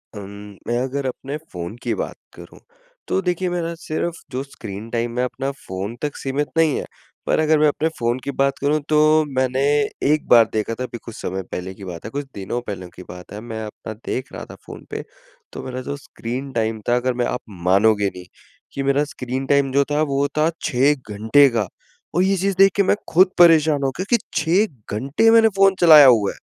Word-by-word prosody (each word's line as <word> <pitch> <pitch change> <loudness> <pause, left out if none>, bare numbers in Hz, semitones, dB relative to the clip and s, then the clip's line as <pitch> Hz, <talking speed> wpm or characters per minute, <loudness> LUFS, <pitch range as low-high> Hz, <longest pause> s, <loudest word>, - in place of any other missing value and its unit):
अम, 100 0 -9
मैं 120 0 0
अगर 135 +1 -3
अपने 135 +3 -4
फ़ोन 85 +3 -6
की - - 0
बात - - -4 0.2
करूँ, - - -13 0.5
तो 190 - 0
देखिए 180 0 -1
मेरा 170 -1 -2
सिर्फ़ 170 +1 -3
जो 130 +2 -3
स्क्रीन 110 -5 -9
टाइम 120 +1 -2
है - - +2
अपना 135 +2 -4
फ़ोन 100 -3 -6
तक 150 -1 -3
सीमित 140 +2 -2
नहीं 160 -3 +3
है। - - -4 0.4
पर - - +1
अगर 155 -1 +3
मैं 155 - +5
अपने 155 +2 0
फ़ोन 120 +2 0
की 140 - -3
बात 135 0 0
करूँ 150 +2 +1
तो 150 -1 +4 0.4
मैंने 130 0 +1 0.5
एक 155 0 0
बार 115 -2 +7
देखा 110 +1 -1
था - - -2
अभी 125 -1 -6
कुछ 115 - -9
समय 95 +1 -4
पहले 95 +1 -5
की 100 - -13
बात 85 +1 -8
है, - - -4
कुछ 145 +2 -4
दिनों 100 +5 -3
पहले 95 -3 -5
की 90 - -10
बात 90 0 -11
है, 105 - -6
मैं 110 -1 -6
अपना 105 +1 -8
देख 130 - -4
रहा - - -7
था - - -10
फ़ोन - - -11
पे - - -4 0.5
तो - - -7
मेरा 130 0 -5
जो 140 +2 -5
स्क्रीन 130 0 -6
टाइम 110 -1 -1
था 120 - +4
अगर 125 +1 0
मैं 120 0 -1
आप 125 - -2 0.2
मानोगे 100 +2 +3
नहीं 90 0 -9 0.5
कि 140 - -3
मेरा 140 +2 +2
स्क्रीन 135 -3 -5
टाइम 140 -1 +2
जो 140 +1 +3
था 150 +1 +2
वो 140 -1 +1
था 155 +2 +3
6 135 +4 +3 0.2
घंटे 110 +8 +4
का, 115 -5 -1 0.5
और 180 - +3
ये 195 +1 +2
चीज़ 195 +1 0
देख 195 0 +6
के 200 - +3
मैं 195 - +3 0.2
ख़ुद 185 +3 +6
परेशान 160 -4 +5
हो 135 - +2
गया 185 - -3
कि - - +4 0.2
6 160 - 0
घंटे 140 - +2
मैंने 225 -1 +6
फ़ोन 195 -1 +5
चलाया 155 -4 +9
हुआ 110 -5 +4
है। - - -13
135 Hz, 215 wpm, -21 LUFS, 110-155 Hz, 0.5 s, चलाया